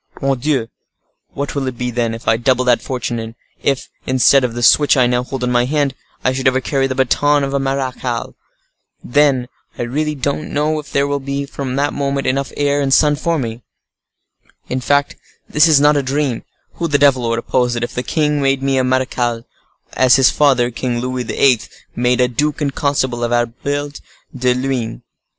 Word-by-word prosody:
Mordioux! 135 -2 0 0.7
what 140 0 -3
will 140 -2 -2
it 130 -2 -4
be 125 0 -2
then, 115 -1 -1
if 115 - -12
I - - +4
double 125 +2 +1
that 125 -1 +3
fortune; 125 -2 -3
and 115 0 -7 0.3
if, 135 -2 -1 0.2
instead 130 +1 +4
of 120 -2 -2
the 120 - -3
switch 145 +5 +5
I 125 - +5
now 125 0 +1
hold 130 0 -5
in 125 - 0
my 120 0 +2
hand, 145 0 0 0.3
I 130 - +3
should 130 0 -1
ever 130 0 +3
carry 135 0 0
the 130 - -3
baton 145 +3 +2
of 135 0 -2
a 140 - +1
marechal? 130 -3 -3 0.7
Then 135 -2 +2 0.3
I - - -2
really 150 +5 -2
don't 140 +3 -3
know 155 +2 0
if 150 - -10
there 140 0 +2
will 140 0 -1
be, 140 +1 -3
from 135 -2 -5
that 145 +1 0
moment, 140 -1 -2
enough 135 +1 0
of - - -15
air 145 0 +1
and 135 -1 -1
sun 150 +2 +4
for 165 +3 -1
me. 115 -3 -4 1.1
In 130 0 -2
fact, 145 +2 +1 0.3
this 150 +2 +4
is 155 -3 +5
not 150 +1 +4
a 145 - +2
dream, 135 -2 -2 0.3
who 170 - -1
the 145 -2 +2
devil 130 -4 +3
would 115 - 0
oppose 125 +1 0
it, 120 - -2
if 120 - -4
the 125 - -2
king 150 +2 0
made 135 -1 +1
me 135 -1 +1
a - - +2
marechal, 125 -2 -1 0.5
as 130 -1 +5
his 135 -2 +5
father, 130 -5 +2
King 120 +1 -3
Louis 125 -1 -3
XIII., 130 -4 +3 0.4
made 125 +1 +1
a 125 - +4
duke 145 +5 -1
and 140 -3 -1
constable 130 -4 -1
of 120 - -1
Albert 140 +5 -2 0.3
de 125 -1 +1
Luynes? 125 - -3
130 Hz, 205 wpm, -17 LUFS, 125-140 Hz, 1.1 s, switch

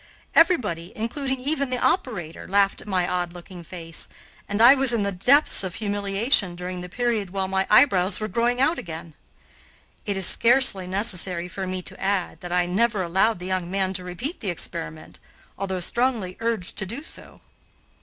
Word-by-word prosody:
Everybody, 210 - +3
including 265 +4 -2
even 280 0 0
the 250 - 0
operator, 210 - -1
laughed 195 0 +2
at - - -14
my 185 -3 +1
odd 175 -1 -2
looking 175 0 -11
face, 165 -1 -6 0.4
and 205 - -1
I 240 +4 +9
was 270 -3 +2
in 225 -3 +1
the 200 - 0
depths 245 +8 +4
of 185 -2 -4
humiliation 205 -1 0
during 180 0 -5
the 180 - -8
period 230 -2 -1
while 190 0 -2
my 190 0 0
eyebrows 195 -6 +5
were 215 - -2
growing 235 +5 0
out 310 +6 +2
again. 160 -1 -8 0.9
It 200 -1 0
is 190 - -1
scarcely 235 -4 +3
necessary 185 -3 -2
for 190 +1 -5
me 185 0 -4
to - - -6
add 195 -2 -1
that 175 - -7
I 180 0 +2
never 205 +2 +1
allowed 190 +6 +2
the 180 - -8
young 185 -2 -2
man 190 0 0
to 180 -1 -3
repeat 180 - -5
the 200 - -3
experiment, 165 -2 -5 0.4
although 190 -2 -3
strongly 225 -2 0
urged 230 -5 -2
to 195 - -3
do 240 +9 -6
so. - - -13
195 Hz, 180 wpm, -24 LUFS, 180-235 Hz, 0.9 s, I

